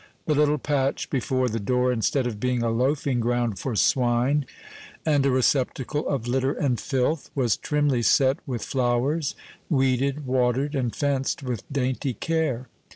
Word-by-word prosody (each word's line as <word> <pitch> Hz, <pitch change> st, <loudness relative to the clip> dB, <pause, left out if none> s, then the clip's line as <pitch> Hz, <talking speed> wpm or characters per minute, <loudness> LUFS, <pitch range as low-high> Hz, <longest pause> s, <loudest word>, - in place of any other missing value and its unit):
The 155 Hz, -, +2 dB
little 150 Hz, 0 st, +3 dB
patch 140 Hz, -1 st, -1 dB
before 130 Hz, 0 st, 0 dB
the 115 Hz, -1 st, -2 dB
door, 125 Hz, +4 st, +1 dB
instead 125 Hz, +3 st, 0 dB
of 110 Hz, -4 st, -3 dB
being 125 Hz, 0 st, 0 dB
a 115 Hz, -, +1 dB
loafing 130 Hz, +2 st, 0 dB
ground 120 Hz, -4 st, 0 dB
for 125 Hz, +2 st, -3 dB
swine, 125 Hz, +5 st, +2 dB, 0.6 s
and 145 Hz, -3 st, +3 dB
a 140 Hz, -, +3 dB
receptacle 130 Hz, +2 st, 0 dB
of 130 Hz, -4 st, -2 dB
litter 130 Hz, +2 st, +1 dB
and 130 Hz, -5 st, 0 dB
filth, 140 Hz, +2 st, -1 dB
was 125 Hz, -7 st, +2 dB
trimly 145 Hz, -4 st, 0 dB
set 130 Hz, -, +3 dB
with 125 Hz, -4 st, -3 dB
flowers, 135 Hz, +4 st, 0 dB, 0.3 s
weeded, 135 Hz, 0 st, +1 dB
watered, 130 Hz, +3 st, +1 dB
and 125 Hz, -5 st, -1 dB
fenced 140 Hz, -1 st, -1 dB
with 125 Hz, -3 st, -5 dB
dainty 130 Hz, -1 st, -1 dB
care. 150 Hz, -4 st, -1 dB
130 Hz, 155 wpm, -25 LUFS, 120-140 Hz, 0.6 s, little